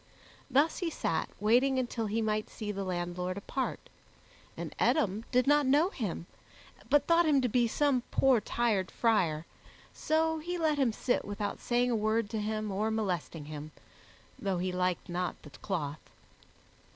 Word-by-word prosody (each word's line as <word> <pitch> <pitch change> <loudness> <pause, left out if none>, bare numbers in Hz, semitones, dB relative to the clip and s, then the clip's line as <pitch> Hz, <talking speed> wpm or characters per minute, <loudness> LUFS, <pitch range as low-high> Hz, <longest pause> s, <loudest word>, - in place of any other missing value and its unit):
Thus 280 +5 +3
he 350 - -1
sat 165 - -1
waiting 245 +6 +3
until 240 -3 -1
he 220 +2 0
might 215 0 -1
see 210 -2 -5
the 200 -1 -3
landlord 180 0 -3
apart, 260 +6 -3 0.7
and - - -5
Eadom 220 -8 +2
did 250 0 +3
not 290 0 +4
know 295 +7 +4
him, 195 - -4 0.6
but 290 - +4
thought 335 0 +4
him 290 -3 +4
to 250 - +2
be 240 +1 +2
some 275 +1 +2
poor 260 -4 +4
tired 210 -5 0
friar, 170 -9 +1 0.5
so 320 0 +1
he 350 +3 -3
let 310 -3 +1
him 260 -4 +3
sit 245 +3 0
without 205 0 -4
saying 245 +1 +1
a - - +2
word 215 0 0
to 220 - -1
him 215 0 -2
or 210 +3 0
molesting 180 -8 -2
him, 150 0 -7 0.7
though 195 -2 -1
he 180 +1 -1
liked 180 -1 -1
not 180 +1 -3
the 150 - -12
cloth. 150 -1 -4
220 Hz, 165 wpm, -31 LUFS, 185-260 Hz, 0.7 s, not